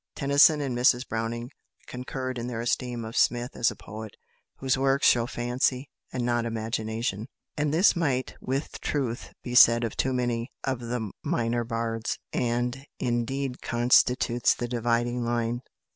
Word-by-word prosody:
Tennyson 145 +2 +5
and 135 -4 -2
Mrs 125 +1 +3
Browning 115 +2 -3 0.3
concurred 130 0 -5
in 120 - -4
their 120 -2 -4
esteem 120 0 -2
of 110 - -7
Smith 120 +1 +1
as 115 - +3
a - - -7
poet 110 -1 -9 0.4
"whose 130 -1 0
works 135 +1 +3
show 120 -1 +4
fancy, 125 +2 -1 0.2
and 125 -2 -2
not 120 -1 +1
imagination"; 110 -1 -3 0.3
and 150 -1 0
this 175 +7 +5
might 135 -7 0
with 135 +3 -3
truth 130 -5 -2
be 120 - -5
said 120 -1 +7
of 115 - -3
too 130 - 0
many 120 -1 -1
of 130 -2 -1
the 120 -3 -4
minor 120 0 0
bards, 115 -1 -2 0.2
and, 120 +2 -1 0.2
indeed, 125 +2 -2
constitutes 120 0 +3
the 120 - -3
dividing 120 0 0
line. 120 0 -1
120 Hz, 150 wpm, -27 LUFS, 115-130 Hz, 0.4 s, said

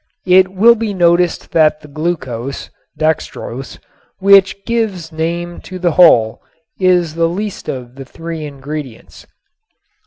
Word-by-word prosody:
It 185 0 +5
will 200 +6 +5
be 220 -3 -3
noticed 175 -1 +1
that 155 -1 +3
the - - -13
glucose 140 -5 -4 0.3
(dextrose), 135 -5 -3 0.4
which 195 0 +4
gives 210 -8 -2
name 170 +2 -4
to 185 - -9
the 175 -1 0
whole, 135 -11 +4 0.4
is 180 -4 +2
the 165 0 +1
least 200 +3 -5
of 125 -2 -6
the 135 0 -10
three 165 +3 -7
ingredients. 140 -3 -8
170 Hz, 125 wpm, -16 LUFS, 150-185 Hz, 0.4 s, It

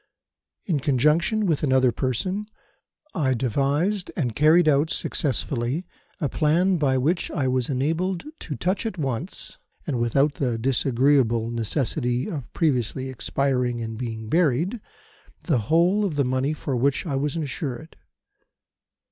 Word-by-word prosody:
"In 165 -7 0
conjunction 150 - +2
with 160 -6 +1
another 130 -3 +3
person, 185 - -2 0.7
I 135 -5 +1
devised 140 - 0
and 125 -9 -1
carried 155 +3 +5
out 150 +1 +3
successfully 135 +2 -1 0.3
a 150 - 0
plan 170 +7 +2
by 135 -4 +2
which 160 +7 +1
I 130 - -1
was 130 0 0
enabled 165 +7 -1 0.2
to 150 - -5
touch 190 - -1
at 215 - -5
once, 135 - -3 0.3
and 135 -7 -2
without 135 +5 +2
the 125 -4 +1
disagreeable 125 -1 +2
necessity 125 +2 -1
of 150 - -6
previously 130 -4 0
expiring 125 -1 -1
and 110 -1 -4
being 110 -2 -5
buried, 170 - +1 0.6
the 150 -8 +1
whole 175 +6 +4
of 185 -7 -1
the 140 -2 +2
money 130 +3 0
for 145 -3 -3
which 135 +7 +1
I 145 -5 -2
was 140 +2 -1
insured. 150 -1 -4
140 Hz, 135 wpm, -24 LUFS, 125-165 Hz, 0.7 s, carried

